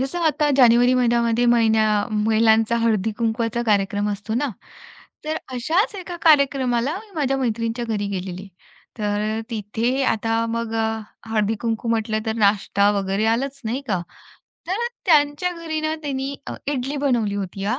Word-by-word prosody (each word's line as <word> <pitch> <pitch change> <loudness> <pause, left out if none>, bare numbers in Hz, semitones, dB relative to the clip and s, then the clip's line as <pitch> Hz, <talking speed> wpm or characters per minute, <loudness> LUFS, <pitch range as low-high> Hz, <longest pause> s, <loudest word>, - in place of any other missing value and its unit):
जसं 270 +6 -2
आता 300 -1 +2
जानेवारी 245 -1 +5
महिन्यामध्ये 235 -1 +2
महिन्या 225 -2 +4 0.3
महिलांचा 220 +1 +3
हळदी-कुंकवाचा 225 +1 0
कार्यक्रम 205 -2 +1
असतो 210 +2 -4
ना, 280 +5 0 0.8
तर 310 +1 -2 0.2
अशाच 325 - 0
एका 360 -2 -6
कार्यक्रमाला 275 -2 +3
मी 435 -1 -17
माझ्या 275 -4 0
मैत्रिणीच्या 230 -1 -1
घरी 215 -3 -2
गेलेली. 190 0 -5 0.5
तर 205 -1 -1 0.2
अ, - - -2
तिथे 230 +4 -1
आता 225 -1 0
मग 230 0 -3
अ, 225 0 0 0.3
हळदी-कुंकू 225 +1 -1
म्हटलं 220 -1 0
तर 220 - +1
नाश्ता 200 -1 +3
वगैरे 195 +2 -1
आलाच 265 +5 -1
नाही 235 +5 -2
का. 190 -4 0 0.7
तर 450 +6 0 0.2
त्यांच्या 300 +1 +3
घरी 325 -2 -4
ना, 310 0 -1
तिनी 275 -1 -3
अ, - - -5
इडली 275 0 -2
बनवली 240 -8 0
होती 195 -1 -4
हां. 230 +6 0
230 Hz, 145 wpm, -22 LUFS, 215-270 Hz, 0.8 s, जानेवारी